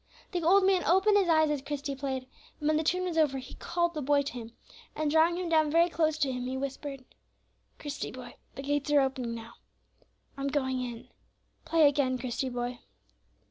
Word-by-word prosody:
The 355 -2 -1
old 375 +4 +5
man 375 -2 +3
opened 385 +4 +4
his 375 -3 +1
eyes 315 -2 +4
as 290 -2 -1
Christie 280 0 -4
played, 265 -1 -4 0.3
and, 300 - -2
when 310 - +3
the - - +2
tune 360 +3 +1
was 345 -3 -1
over, 290 -4 +2
he 260 -1 -8
called 345 0 -1
the 305 - -3
boy 285 +1 +2
to 280 - -5
him; 235 -2 -8 0.4
and, 305 -1 0
drawing 325 +2 +4
him 365 -1 -3
down 315 -2 +3
very 335 +3 +4
close 315 -2 +1
to 285 -4 +1
him, 250 0 -4
he 260 +1 -3
whispered, 275 0 -5 0.7
"Christie, 290 -2 -5
boy, 250 -1 -9 0.2
the 275 - -6
gates 290 +1 -1
are 295 -1 +5
opening 260 -3 -2
now. 230 0 -9 0.8
I'm 275 0 -2
going 260 -2 -1
in. 240 -2 -7 0.6
Play 325 -2 +5
again, 270 -3 +1
Christie, 255 +1 -3
boy." 245 0 -4
290 Hz, 200 wpm, -29 LUFS, 260-320 Hz, 0.8 s, old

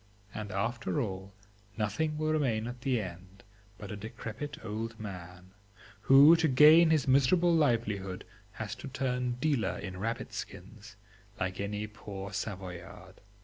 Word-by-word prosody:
and 105 -1 -5
after 115 +8 -1
all, 95 -5 -4 0.5
nothing 150 +9 -1
will 155 0 0
remain 120 -8 0
at 120 0 -7
the 130 -3 +1
end 95 0 -9 0.3
but 100 -3 -8
a - - -4
decrepit 110 +6 -7
old 115 +1 -5
man, 90 -3 -9 0.5
who 140 +8 +8
to 160 -1 +2
gain 155 +5 +7
his 155 -4 +2
miserable 140 +7 +4
livelihood 110 - 0 0.3
has 110 -2 -5
to 115 - -8
turn 125 -2 -1
dealer 130 -1 0
in 90 -1 -7
rabbit 115 +4 -3
skins, - - -9 0.4
like 95 +1 -2
any 105 +1 -3
poor 105 -1 -8
Savoyard. 90 -4 -7
110 Hz, 140 wpm, -30 LUFS, 100-135 Hz, 0.5 s, who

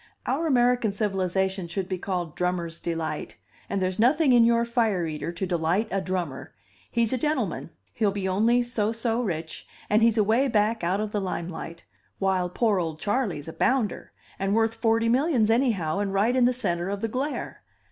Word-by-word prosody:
Our 315 +5 0
American 245 -5 +3
civilization 190 -2 -1
should 180 +2 -3
be 185 -1 -3
called 180 -4 -3
Drummer's 175 -2 -2
Delight 165 -2 -4 0.3
and 200 - -1
there's 185 +1 -2
nothing 270 +4 +4
in 240 -1 +7
your 235 0 +3
fire 225 -7 +1
eater 155 +1 -4
to 175 +3 -3
delight 175 +4 0
a 195 - 0
drummer: 180 -8 -4 0.3
he's 235 0 +1
a 255 - 0
gentleman, 300 +4 -1 0.2
he'll 215 -3 +1
be 195 -1 -2
only 225 +6 +3
so 225 -3 -1
so 230 +1 -1
rich, 165 -7 -4 0.2
and 215 +2 +4
he's 230 0 +4
away 225 +6 +3
back 220 -2 +1
out 185 +4 +1
of 215 -1 -3
the 205 - -1
lime 180 -2 -3
light, 170 -1 -8 0.3
while 190 -2 +1
poor 210 +1 +1
old 160 -3 -3
Charley's 205 - -1
a 160 - -6
bounder, 260 -5 0 0.3
and 195 +1 0
worth 225 0 +2
forty 230 0 +1
millions 245 -3 +3
anyhow, 210 - +1
and 200 -1 -1
right 210 +6 +2
in 255 -2 +4
the 250 - +4
centre 175 -7 -2
of 200 0 -3
the 225 - 0
glare. 265 +6 -4
205 Hz, 190 wpm, -26 LUFS, 180-235 Hz, 0.3 s, in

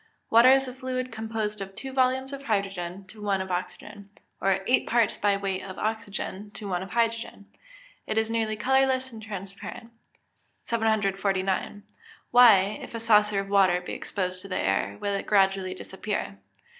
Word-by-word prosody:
_ - - -34 0.3
Water 235 +3 +8
is 270 0 +5
a 255 - -6
fluid 255 -1 -4
composed 220 -2 -3
of 195 0 -7
two 265 -1 -6
volumes 260 +1 +1
of 275 - -6
hydrogen 195 -3 -2
to 210 +3 -13
one 200 -2 0
of 190 0 -4
oxygen, 200 +3 -5 0.3
or 195 0 +2
eight 250 - +2
parts 230 -2 +2
by 200 -1 +1
weight 195 -1 -2
of 190 -1 -8
oxygen 210 -2 -4
to 205 - -5
one 180 -2 -1
of 190 - -7
hydrogen. 230 -1 -1 0.6
It 215 - -2
is 220 0 +2
nearly 220 -1 0
colourless 260 +2 +2
and 225 -1 -10
transparent. 200 +2 -8 0.7
749. 200 -3 0 0.5
_Why, 215 -5 +6
if - - -9
a - - -3
saucer 210 -2 +4
of 195 - -9
water 190 -3 +4
be 180 - -7
exposed 185 -2 -3
to 195 - -9
the 185 - -3
air, 100 +1 0
will 200 - -1
it 200 - -3
gradually 195 -2 +2
disappear? 190 - -5
205 Hz, 170 wpm, -27 LUFS, 195-230 Hz, 0.7 s, Water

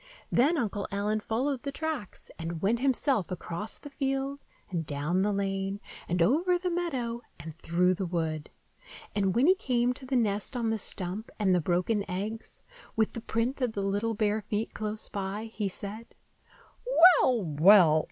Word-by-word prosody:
Then 295 +8 +4
Uncle 205 -6 -2
Allen 205 +2 0
followed 250 +5 -1
the 280 - -4
tracks, 310 -8 -5
and 165 0 -4
went 225 +4 +2
himself 260 - +1
across 185 +3 -5
the 290 - -11
field 270 0 -2 0.3
and 170 -3 -1
down 150 +5 -1
the 205 +2 +2
lane 195 0 -1 0.3
and 175 0 +3
over 340 - +3
the 360 0 -2
meadow 260 -10 -2 0.2
and 155 +1 -8
through 180 +2 +2
the 185 0 -3
wood. 160 -3 -2 0.6
And 195 -2 +1
when 245 +4 +4
he 365 - +7
came 250 -8 +1
to 260 +1 -10
the 265 - -1
nest 215 +1 +1
on 230 -2 0
the 220 - -1
stump 190 +3 -4
and 195 -3 +2
the 180 - +3
broken 180 +6 +1
eggs, 210 +5 -5 0.3
with 220 -1 +1
the 230 - -5
print 235 +4 -1
of 245 -3 0
the 200 - -2
little 205 +3 0
bare 215 0 +1
feet 210 +1 -3
close 215 0 -4
by, 200 +2 -4
he 205 -3 -1
said, 210 +5 -8 1.1
"Well, 240 -5 +2
well! 160 +1 +6
210 Hz, 170 wpm, -29 LUFS, 190-245 Hz, 1.1 s, he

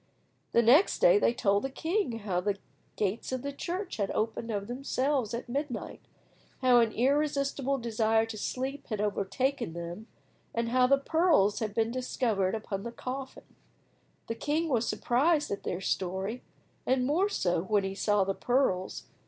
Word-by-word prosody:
The 235 - +4
next 275 - +5
day - - +6
they - - +3
told 205 -5 +1
the 270 - -1
king 325 - -1
how 185 -3 -1
the 200 +1 -1 0.4
gates 210 +4 -2
of 255 -1 -3
the 280 0 -4
church 360 +6 -4
had 200 -2 -1
opened 225 +1 -2
of 205 -2 -2
themselves 260 0 -1
at 240 - -6
midnight, 270 -1 -4 0.6
how 250 -1 +6
an 230 -2 +3
irresistible 275 +1 +1
desire 225 -2 +1
to 225 -1 -7
sleep 265 +6 -4
had 215 -3 -3
overtaken 210 - -1
them, 170 +6 -7 0.5
and 230 0 0
how 250 +1 +4
the 275 +1 +5
pearls 305 - +3
had 215 -2 -3
been 225 0 +1
discovered 230 -6 0
upon 210 -3 -4
the 235 - -5
coffin. 260 +2 -7 0.7
The - - -3
king 305 +7 -1
was 240 -4 +1
surprised 295 +5 +2
at 200 - -3
their 180 - -3
story, 190 +6 -2 0.4
and 255 -1 +1
more 345 +9 +2
so 175 - 0
when 205 +2 +1
he 195 0 -3
saw 205 0 +2
the 195 +1 -1
pearls. 240 -6 0
235 Hz, 165 wpm, -29 LUFS, 205-275 Hz, 0.7 s, day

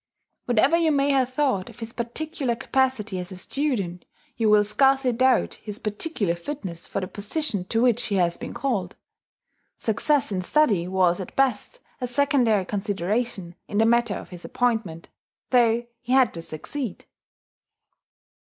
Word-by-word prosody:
Whatever 245 +6 +3
you 330 -2 +3
may 280 -1 +2
have 260 -2 +2
thought 255 -9 0
of - - -14
his 225 0 -6
particular 260 +2 -3
capacity 235 -6 0
as 180 0 -6
a 185 - -7
student, 195 - -2 0.3
you 225 -2 +1
will 210 0 +6
scarcely 265 +4 +3
doubt 255 +1 +2
his 210 -1 -6
particular 210 - -2
fitness 175 - -6
for - - -3
the 185 - -3
position 210 - -2
to 225 +4 +1
which 245 -1 +2
he 205 - -1
has 175 -2 +2
been - - -7
called. 205 -10 -2 0.8
Success 265 +4 +1
in 185 -2 -1
study 200 - +2
was 185 -1 +2
at 190 - -7
best 270 - 0 0.2
a 250 - -2
secondary 245 -6 +2
consideration 200 -1 -2
in 205 - -3
the 220 - +5
matter 235 -2 +3
of - - -8
his 180 -1 -8
appointment, 225 -9 -1 0.4
though 240 -1 +4
he 245 +2 -3
had 260 -3 +4
to 165 - -6
succeed. 205 - -6
230 Hz, 155 wpm, -25 LUFS, 190-265 Hz, 0.8 s, will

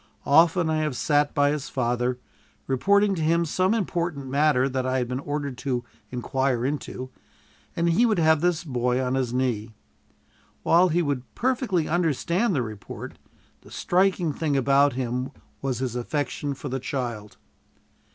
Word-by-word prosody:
Often 165 +4 +4
I 155 - +1
have 155 -4 -1
sat 145 +4 +1
by 145 0 +3
his 150 -2 -3
father, 125 0 -1 0.5
reporting 200 +10 +3
to 170 - -3
him 170 +2 +2
some 185 +6 +1
important 175 -8 -2
matter 135 -1 +2
that 130 -1 -2
I 130 0 0
had 125 -1 -1
been 125 +1 -3
ordered 145 -2 -4
to 125 -4 -2 0.3
inquire 125 0 -1
into, 130 -2 -4 0.6
and 170 0 +1
he 185 +9 +4
would 215 -3 +1
have 160 -2 +4
this 175 -1 +1
boy 125 -4 0
on 130 -1 -1
his 130 -3 0
knee. 120 -4 -1 0.9
While 180 +2 +5
he 175 +2 +1
would 140 -4 -1
perfectly 240 - 0
understand 175 - +1
the 130 - +1
report, 110 -3 -8 0.4
the - - -17
striking 180 -3 +1
thing 145 -2 -1
about 140 +1 +4
him 125 +1 -2 0.3
was 135 -3 -1
his 125 -2 -3
affection 140 +2 -2
for 145 - -7
the 135 0 -2
child. 120 -6 -4
140 Hz, 160 wpm, -25 LUFS, 125-170 Hz, 0.9 s, While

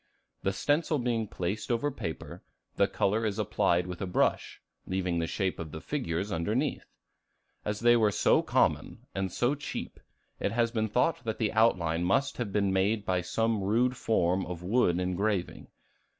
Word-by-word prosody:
The 95 - 0
stencil 150 - +1
being 120 -3 -1
placed 95 +4 -3
over 130 +5 +1
paper, 80 - -6 0.3
the - - +3
color 105 +3 0
is 105 -2 -1
applied 90 -4 +1
with 90 -1 -7
a 95 - -2
brush, 90 - 0 0.3
leaving 90 -2 -1
the 80 - -1
shape 95 +1 -2
of 80 -2 -6
the 80 - -6
figures 100 - -3
underneath. 110 - -1 0.8
As 105 +1 -3
they 120 0 +6
were 110 -3 +3
so - - +3
common - - 0
and 95 -1 -2
so 120 +8 +1
cheap, 145 - -6 0.4
it - - -1
has 115 0 +1
been 110 -2 0
thought 165 +9 +1
that 110 -1 -3
the 110 -1 0
outline 85 -7 +2
must 135 +10 +1
have 120 -5 -3
been 100 -1 +1
made 100 +2 +1
by 90 -1 +1
some 110 +4 0
rude 120 +6 +2
form 95 -6 +1
of 90 -1 -6
wood 90 -3 +2
engraving. 90 +1 -1
105 Hz, 170 wpm, -29 LUFS, 90-115 Hz, 0.8 s, they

